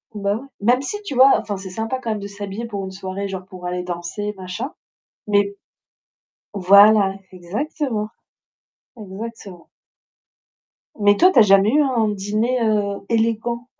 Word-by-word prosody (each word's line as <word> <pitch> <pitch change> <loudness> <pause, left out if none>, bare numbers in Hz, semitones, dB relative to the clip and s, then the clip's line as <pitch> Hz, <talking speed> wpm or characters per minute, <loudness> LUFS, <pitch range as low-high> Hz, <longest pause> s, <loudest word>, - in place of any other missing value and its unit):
Bah 200 0 -1
ouais! 255 - -9 0.2
Même 245 +5 +3
si, 415 +9 -4
tu 290 -10 -6
vois, 265 +2 +7
enfin 205 -2 -5
c'est 190 -1 -8
sympa 225 +5 -3
quand 235 -3 -4
même 215 - -2
de 200 - -6
s'habiller 205 +3 -6
pour 200 -3 -5
une 190 - -7
soirée, 190 +1 -5
genre 190 -1 -6
pour 185 -2 -11
aller 180 0 -2
danser 180 +4 -5
machin, 190 +10 -5 0.5
mais 200 -1 +1 1.0
voilà! 200 +1 +6 0.2
Exactement! 215 - -3 0.9
Exactement. 205 -3 -9 1.3
Mais 205 0 +5
toi, 365 - +6
tu - - +3
as - - +10
jamais 195 +1 +5
eu 300 +3 +4
un 240 -6 +1
dîner, 210 +5 -1
heu, 205 -2 0
élégant? 230 +2 -1
205 Hz, 150 wpm, -21 LUFS, 195-230 Hz, 1.3 s, as